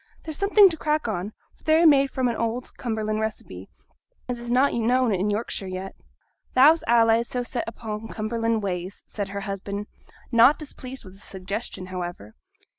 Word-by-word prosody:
They're 315 - -6
something 400 +4 +6
to 325 - -5
crack 305 -3 0
on, 200 -1 -3 0.2
for - - -30
they 315 0 +4
are 340 - +4
made 275 -3 +6
fra' 260 -1 0
an 235 - -1
old 230 +2 -3
Cumberland 215 -2 -2
receipt, 145 - -5 0.6
as 245 -1 -3
is 240 0 -7
not 260 +4 +3
known 245 +1 +2
i' 195 +2 0
Yorkshire 205 -2 -2
yet.' 185 +1 -6 0.6
'Thou's 300 +6 +6
allays 230 0 +4
so 250 -1 -2
set 240 -1 -3
upo' 225 -1 -6
Cumberland 225 0 -1
ways!' 185 0 -4
said 205 -2 -5
her 200 0 -4
husband, 200 +1 -4 0.5
not 240 +5 +6
displeased 265 -4 -8
with 185 - -12
the 195 - -17
suggestion, 190 +1 -5
however. 175 - -6
225 Hz, 175 wpm, -25 LUFS, 200-255 Hz, 0.6 s, something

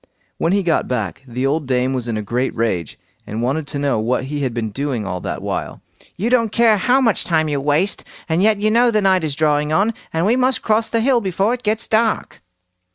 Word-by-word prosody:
When 165 - +1
he 200 0 +2
got 170 -2 +1
back, 110 -4 -3
the 125 +2 -3
old 145 +1 0
dame 130 0 +1
was 125 -2 -3
in 115 -2 -2
a 105 - -3
great 125 +5 -2
rage, 100 -8 -2 0.3
and 110 +3 -4
wanted 140 +4 -1
to 145 - -4
know 140 -5 0
what 120 +4 0
he 145 +2 -4
had 135 -3 -1
been 115 -2 -3
doing 130 -2 -3
all 90 -1 -3
that - - -5
while. - - -4 0.3
"You 225 +6 -1
don't 230 -4 +2
care 225 -2 +4
how 250 +7 +3
much 225 -5 +2
time 160 -2 +1
you 145 -2 -1
waste, 150 +7 0 0.2
and 165 +1 +1
yet 215 +1 +4
you 215 +1 +1
know 240 +2 +4
the 215 -2 +2
night 190 -2 +3
is 150 -3 -2
drawing 150 -1 +1
on, 200 +8 +2 0.2
and 165 +2 0
we 225 +4 +3
must 255 0 +1
cross 220 +1 +1
the 230 - +1
hill 245 0 +3
before 195 +3 0
it 245 -3 -6
is 220 +1 0
dark!" 220 0 0
160 Hz, 235 wpm, -19 LUFS, 130-215 Hz, 0.3 s, care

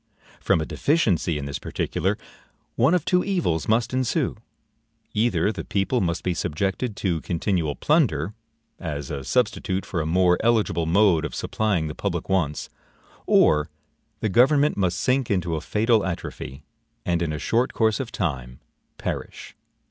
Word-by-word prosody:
From - - +2
a 80 - -1
deficiency 95 - +1
in 70 - -4
this 70 -1 -4
particular, - - -1 0.6
one 135 +9 +4
of 175 -3 0
two 180 -1 +3
evils 170 - 0
must 115 +2 +1
ensue; 130 +2 0 0.8
either 110 -1 +2
the - - -6
people 100 +5 0
must 85 -3 -1
be 90 - 0
subjected 95 +8 -2
to 85 -6 -1
continual 85 -3 -1
plunder, 105 - +1 0.5
as 75 -4 -5
a 70 -2 -4
substitute 100 - 0
for 85 - -2
a 80 - -2
more 90 +1 +3
eligible 110 -8 +2
mode 90 -2 +4
of - - -4
supplying 100 -7 0
the 75 - -5
public - - -3
wants, 85 -6 0 0.6
or 75 +1 +4 0.5
the 110 - 0
government 140 +8 +4
must 90 -3 0
sink 130 -1 +1
into 90 -4 0
a 80 - -3
fatal 110 0 +2
atrophy, 85 -6 -5 0.4
and, 85 -1 +1
in 85 -2 0
a 75 - -3
short 120 +10 +1
course 110 0 +2
of 130 -4 -4
time, 65 -9 -3 0.4
perish. - - -5
95 Hz, 155 wpm, -24 LUFS, 80-120 Hz, 0.8 s, one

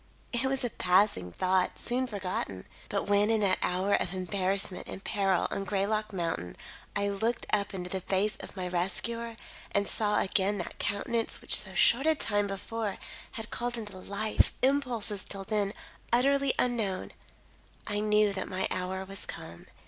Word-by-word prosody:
It 240 +2 +2
was 265 0 +1
a 245 - -1
passing 180 - +2
thought, 185 - +1
soon 255 +2 0
forgotten. 185 - -4 0.2
But 200 - 0
when 205 +1 +3
in 225 -1 +3
that 190 -2 +3
hour 185 +3 +1
of 190 - +1
embarrassment 190 +1 +1
and 195 - -7
peril 195 -3 +1
on 195 - -2
Greylock 210 +2 0
Mountain, 165 - -3 0.4
I 200 0 +1
looked 225 +4 -1
up 200 -1 +2
into 180 -2 -5
the 190 - -2
face 195 +3 +1
of - - -9
my 185 -1 -2
rescuer 230 +6 -1 0.4
and 200 0 +1
saw 210 -1 +2
again 200 +1 +2
that 175 - -6
countenance 225 +3 -1
which - - +1
so - - +3
short 270 +6 +4
a 315 - +5
time 205 -7 +2
before 200 +1 -3 0.4
had 225 -3 -7
called 240 0 -1
into 210 -4 -6
life 200 +3 +1
impulses 250 -7 +1
till 195 -1 -4
then 205 0 0 0.4
utterly 275 +2 +3
unknown, 220 -7 0 0.7
I 205 -1 -1
knew 210 -1 +3
that 190 - -3
my 185 +1 0
hour 185 +1 -2
was 195 +1 -2
come. 85 0 -8
200 Hz, 165 wpm, -30 LUFS, 190-225 Hz, 0.7 s, a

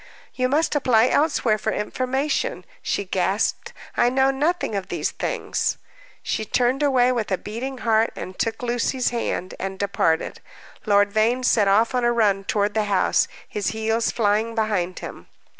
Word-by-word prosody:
"You 255 0 0
must 300 +4 +1
apply 250 -4 +3
elsewhere 245 -8 +2
for - - -1
information," 265 - -2 0.2
she - - -2
gasped. - - -1 0.2
"I 240 - +3
know 265 +1 +3
nothing 300 0 -1
of 195 -2 -3
these - - -2
things." - - -2 0.5
She - - -2
turned 250 +5 +1
away 255 -3 +3
with 230 -5 -2
a 190 - +2
beating 245 +7 -6
heart, 225 -1 +2
and 185 - -7
took 225 +1 -2
Lucy's 245 +1 0
hand, 210 -6 -3
and 190 0 -4
departed. 190 -5 0 0.5
Lord 205 0 +4
Vane 225 +4 +1
set 220 -5 +3
off 220 +5 +3
on 250 -1 0
a 240 - +3
run 205 -4 +2
toward 205 0 0
the 215 0 +1
house, 200 -2 +2 0.2
his 205 -2 -3
heels 220 +1 0
flying 220 +1 0
behind 205 -5 -1
him. - - -10
225 Hz, 160 wpm, -23 LUFS, 205-255 Hz, 0.5 s, Lord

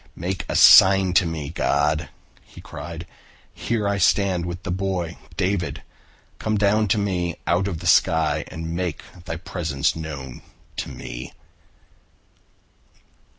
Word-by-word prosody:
"Make 90 +2 -4
a - - -2
sign 95 -1 +7
to 90 -2 +4
me, 80 -3 -5
God," 75 0 0 0.3
he - - -15
cried. 85 +3 -8 0.5
"Here 110 -3 -2
I 100 0 0
stand 95 -4 +2
with 90 +2 -6
the 95 - -3
boy 90 -2 -2 0.2
David. 95 -1 -1 0.6
Come 110 -1 -1
down 105 +1 +2
to 95 - +2
me 90 -4 -1
out 90 +3 +1
of 85 -5 -4
the - - -8
sky 80 -2 +3
and 80 0 -6
make 90 -2 -3 0.2
Thy 80 - -4
presence 80 -5 -2
known 70 -6 -7 0.4
to - - -4
me." 60 +2 -8
85 Hz, 135 wpm, -23 LUFS, 80-95 Hz, 0.6 s, sign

